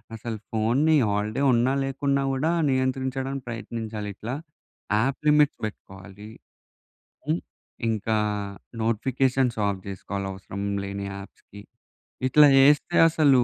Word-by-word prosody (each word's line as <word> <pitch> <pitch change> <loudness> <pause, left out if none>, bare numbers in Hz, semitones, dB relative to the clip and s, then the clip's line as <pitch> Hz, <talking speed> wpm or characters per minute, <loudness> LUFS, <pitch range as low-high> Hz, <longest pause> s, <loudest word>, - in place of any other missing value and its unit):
అసలు 115 0 -5
ఫోన్‌ని 125 +9 +2
హాల్‌డే 105 +5 -1
ఉన్నా 120 +3 +2
లేకున్నా 140 0 0
గూడా, 145 +5 0 0.2
నియంత్రించడానికి 130 0 -1
ప్రయత్నించాలి 110 -2 -5
ఇట్లా. 120 +6 -5 0.6
యాప్ 130 +4 0
లిమిట్ 150 -1 +5
పెట్టుకోవాలి. 100 0 -10 1.0
హ్మ్, 160 +3 +1 0.5
ఇంకా 110 0 -1 0.7
నోటిఫికేషన్స్ 125 +2 +1
ఆఫ్ 100 -2 -2
చేసుకోవాలి 100 0 -5
అవసరం 95 +1 -7 0.2
లేని 100 0 -5
యాప్స్‌కి. 100 +1 -12 0.7
ఇట్లా 150 +3 +7
చేస్తే 145 +5 +4
అసలు 140 -6 +4
120 Hz, 105 wpm, -25 LUFS, 105-135 Hz, 1.0 s, ఇట్లా